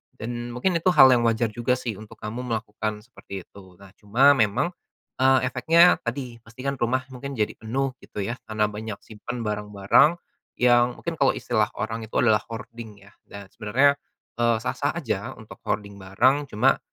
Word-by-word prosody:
dan 120 +1 -5
mungkin 170 +7 +1
itu 165 - -3
hal 130 -1 +9
yang 120 -2 +3
wajar 115 0 +1
juga 120 +3 0
sih 115 -5 -5
untuk 110 +1 -12
kamu 110 +3 -5
melakukan 110 -3 -4
seperti 100 -5 -10
itu. 95 -1 -16
Nah, 100 +1 -16
cuma 120 +7 +5
memang, 115 - +1 0.5
eee, 130 0 +5
efeknya 165 +8 +5
tadi, 120 -1 -4
pasti 115 +3 -13
kan 140 0 -2
rumah 130 +2 0
mungkin 135 +2 -7
jadi 105 -3 0
penuh, 130 +5 -2
gitu 105 - -6
ya, 120 +5 -4
karena 105 -1 0
banyak 105 0 -6
simpan 115 +2 -7
barang-barang 105 - +2 0.4
yang 120 0 +3
mungkin 170 -1 -6
kalau 135 - +3
istilah 110 -3 0
orang 110 0 -4
itu - - -14
adalah 110 -3 +4
hoarding 115 -2 -9
ya 100 - -18 0.2
dan 100 -1 -11
sebenarnya, 135 +7 +2 0.4
eee, 120 -1 +3
sah-sah 130 +4 -1
aja 120 - -3
untuk 110 -2 -13
hoarding 100 -2 -3
barang. 130 +10 +2
Cuma 130 +3 +2
115 Hz, 175 wpm, -24 LUFS, 105-130 Hz, 0.5 s, hal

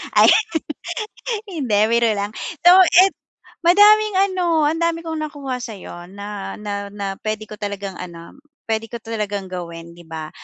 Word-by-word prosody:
ayun. 435 0 +6 1.0
Hindi 265 - -1
biro 235 0 +3
lang. 200 +1 -3 0.3
Though 360 +2 +9 0.2
it 385 -2 +2 0.5
madaming 415 +3 +6 0.2
ano, 345 -4 +1
ang 320 +2 -1
dami 335 0 +1
kong 320 -1 -4
nakuha 280 -4 -4
sa'yo 185 -6 -8
na 200 0 -6
na 200 -1 -4
na 200 -1 -4
puwede 215 0 -3
ko 210 - -7
talagang 200 -2 -5
ano, 170 +4 -10 0.3
puwede 225 0 -1
ko 235 - -4
talagang 205 -3 -3
gawin, 170 -2 -7
'di 175 - -14
ba? 160 -1 -6
215 Hz, 150 wpm, -20 LUFS, 200-325 Hz, 1.0 s, Though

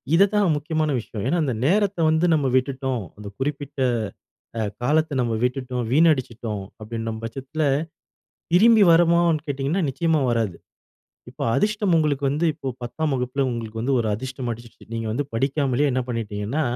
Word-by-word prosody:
இதுதான் 200 -2 +4
முக்கியமான 155 +1 -1
விஷயம். 105 -2 -6
ஏன்னா, 175 - +1
அந்த 130 -4 0
நேரத்தை 200 +1 +2
வந்து 160 +2 +2
நம்ம 145 -4 +2
விட்டுட்டோம். 130 -3 0
அந்த 105 -1 -9
குறிப்பிட்ட 145 0 -4 0.8
அ - - 0 0.2
காலத்த 155 +3 +1
நம்ம 120 -2 0
விட்டுட்டோம், 125 -1 -1
வீணடிச்சுட்டோம் 125 -9 +1 0.2
அப்படின்ற 115 +1 -4
பட்சத்தில, 135 +7 -4 0.9
திரும்பி 220 +3 +7
வருமான்னு 170 -2 +4
கேட்டிங்கன்னா, 140 +6 -1
நிச்சயமா 160 +3 +1
வராது. 115 -6 0 0.7
இப்போ - - -6
அதிர்ஷ்டம் 210 -3 +2
உங்களுக்கு 145 -3 0
வந்து 150 +5 0
இப்போ 145 -2 -7 0.2
10ஆம் 150 +5 -2
வகுப்பில 125 +1 -1
உங்களுக்கு 115 -2 -5
வந்து 135 +2 +1
ஒரு 110 - 0
அதிர்ஷ்டம் 130 +2 -4
அடிச்சிருச்சு. 115 0 -10
நீங்க 115 -1 -3
வந்து 125 +6 -1
படிக்காமலே 135 +2 +1
என்ன 130 0 0
பண்ணிட்டீங்கன்னா 115 +3 -2
135 Hz, 145 wpm, -23 LUFS, 120-160 Hz, 0.9 s, திரும்பி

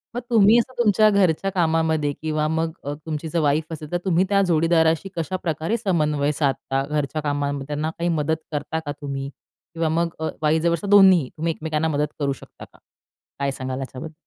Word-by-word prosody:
मग - - 0
तुम्ही 220 0 +6
असं 255 +2 -3
तुमच्या 215 -2 +4
घरच्या 195 -2 +2
कामामध्ये 160 -4 +1
किंवा 155 -1 0
मग 160 +1 -1
अ, 145 - -3
तुमची 155 0 -4
जर 170 - 0
वाईफ 155 +2 +1
असेल, 150 -1 -8
तर 175 - +1
तुम्ही 180 0 +3
त्या 200 -1 +3
जोडीदाराशी 165 +2 +2
कशाप्रकारे 165 +3 -2
समन्वय 150 -9 +1
साधता 135 -2 -1
घरच्या 150 +1 -2
कामामध्ये, 145 -1 -2
त्यांना 150 +1 -2
काही 170 - 0
मदत 160 -1 +1 0.2
करता 150 +2 -3
का 145 - -3
तुम्ही 140 -1 -4
किंवा 165 +3 -6
मग 170 +2 +1
अ, 160 - -1
वाईस 155 +2 +2
वर्सा 170 +3 0
दोन्हीही 190 -8 +6
तुम्ही 165 +2 0
एकमेकांना 155 0 -2
मदत 150 -1 0
करू 140 -1 0
शकता - - -13
का? - - -24 0.6
काय 140 -1 0
सांगाल 130 0 -5
याच्याबद्दल. 135 +4 -7
160 Hz, 180 wpm, -23 LUFS, 145-170 Hz, 0.6 s, तुम्ही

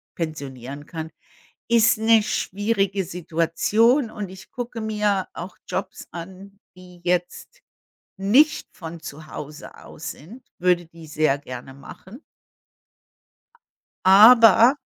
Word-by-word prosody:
pensionieren 140 -4 -6
kann, 160 0 -7 0.6
ist 230 0 +4
'ne 220 0 +4
schwierige 200 -1 -1
Situation 180 - +1
und 205 -3 -6
ich 190 -1 -13
gucke 240 -2 -6
mir 210 -3 0
auch 180 +2 -8
Jobs 190 - -5
an, 190 +3 -10 0.2
die 180 -1 -16
jetzt 180 - -2 0.6
nicht 255 +11 +3
von 165 -1 -9
zu 155 0 -10
Hause 150 0 -9
aus 160 - -8
sind. 220 - -14 0.2
Würde 180 -1 +2
die 165 -1 -14
sehr 150 -2 +1
gerne 130 -1 -9
machen. 190 - -13 1.8
Aber 225 +5 +8
185 Hz, 110 wpm, -23 LUFS, 160-220 Hz, 1.8 s, Aber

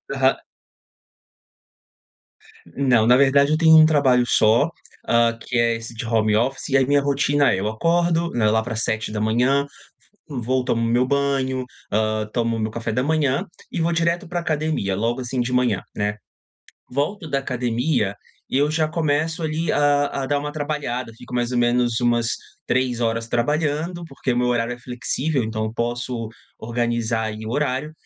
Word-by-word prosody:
Aham. 135 0 +2 2.3
Não. 125 -5 +3
Na 125 - +7
verdade, 140 +1 +4
eu 155 - +3
tenho 160 -1 +7
um 155 - +8
trabalho 140 -5 +3
só, 115 +9 +4 0.4
hã, 115 0 +3
que 120 - -3
é 115 0 +3
esse 115 +1 -8
de 115 +1 -6
home 110 -2 +2
office. 125 +7 -1
E 135 - +4
aí 135 - +3
minha 145 +1 +3
rotina 140 0 +2
é: 95 - -1
eu 105 - -1
acordo, 170 +8 +1
né, 110 -3 +1
lá 110 +1 +2
pras 115 -1 -3
7h, 110 +5 +1 0.6
v 135 -5 -4
vou, 130 +1 +1
tomo 115 -2 0
meu 120 +2 +2
banho, 135 -1 0 0.3
hã, 110 0 0
tomo 115 -1 0
meu 110 0 -2
café 115 0 -4
da 125 +3 0
manhã 145 -2 +1 0.3
e 170 - -2
vou 170 - +1
direto 170 +1 0
pra 175 +1 -2
academia. 155 - -1
Logo 115 +5 -1
assim 125 0 -2
de 120 +1 -2
manhã, 125 -6 +1
né. 105 0 -1 0.8
Volto 155 +7 -2
da 140 - +1
academia 125 -3 -1 0.4
e 130 - +1
eu 145 +1 +2
já 155 0 +1
começo 160 +1 -1
ali 155 +1 -1
a 145 0 +3 0.2
a - - -3
dar 145 +1 +1
uma 150 +1 -5
trabalhada. 145 -6 -3
Fico 125 +1 -10
mais 120 0 0
ou 125 - +1
menos 120 -1 +2
umas 120 -1 +1 0.3
3 125 -1 0 0.3
trabalhando, 150 +7 -1
porque 135 -4 -3
meu 125 0 +1
horário 120 -1 0
é 120 - -8
flexível. 125 +4 -2
Então, 110 0 -3
eu 110 - -4
posso 120 0 -3 0.3
organizar 115 -1 -1
aí 110 0 -5
o - - -4
horário. 145 +2 -1
125 Hz, 170 wpm, -22 LUFS, 115-145 Hz, 2.3 s, um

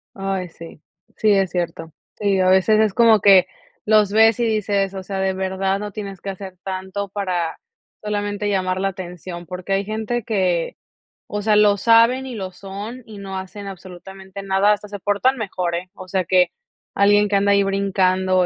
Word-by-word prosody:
Ay, 195 -2 -3
sí, 165 -2 -12 0.3
sí, 215 - +2
es 195 -2 +2
cierto. 165 -2 -4 0.3
Sí, 200 -2 +1
a 185 - +3
veces 190 +3 +4
es 215 -2 +2
como 225 -1 +5
que 190 -2 +6 0.4
los 210 -2 +4
ves 225 +1 +5
y - - +2
dices, 205 -3 0
o 190 - -5
sea, 195 +1 -5
de 190 0 +1
verdad 190 +1 -1
no 210 0 -5
tienes 200 -2 -7
que - - -8
hacer 190 -1 -9
tanto 190 +1 -4
para 185 -4 -2 0.4
solamente 205 0 -2
llamar 185 -2 0
la 195 - +1
atención, 175 -1 -8
porque, 180 +2 -5
hay 195 +1 +1
gente 220 +3 -2
que, 185 -6 0 0.5
o 210 - -3
sea, 210 0 +3
lo 210 -1 +5
saben 230 +5 +4
y 255 -2 -6
lo 190 -3 -5
son, 205 +7 -8
y 215 -2 -11
no 195 -1 -6
hacen 200 +2 -7
absolutamente 190 +1 -10
nada, 195 +1 +3
hasta 210 0 -1
se 205 0 -7
portan 205 +7 +1
mejor, 185 -6 -2
¿eh? 180 +2 -5
O 185 - -11
sea, 185 0 0
que 180 +1 +3 0.4
alguien 205 +1 +4
que 205 - 0
anda 200 +1 +3
ahí 200 0 +4
brincando 190 -2 +1
195 Hz, 190 wpm, -21 LUFS, 185-210 Hz, 0.5 s, que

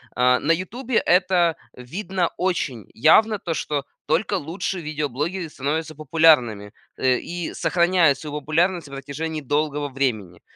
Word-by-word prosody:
а, 125 0 +4
на 160 - +1
"Ютубе" 235 +8 -4
это 180 -2 +3 0.2
видно 175 +7 -3
очень 160 - -2
явно, 210 - +4
то 165 - -3
что 145 -1 -2 0.2
только 170 +6 +1
лучшие 180 +2 -3
видеоблогеры 155 +4 -3
становятся 155 +3 -3
популярными, 140 -9 +3 0.3
э, 130 -1 +2
и 175 -1 -5
сохраняют 170 -5 +3
свою 150 0 -5
популярность 170 +3 0
на 140 - -12
протяжении 155 +3 -5
долгого 145 +1 -1
времени. 110 -10 -2
155 Hz, 130 wpm, -23 LUFS, 140-175 Hz, 0.3 s, а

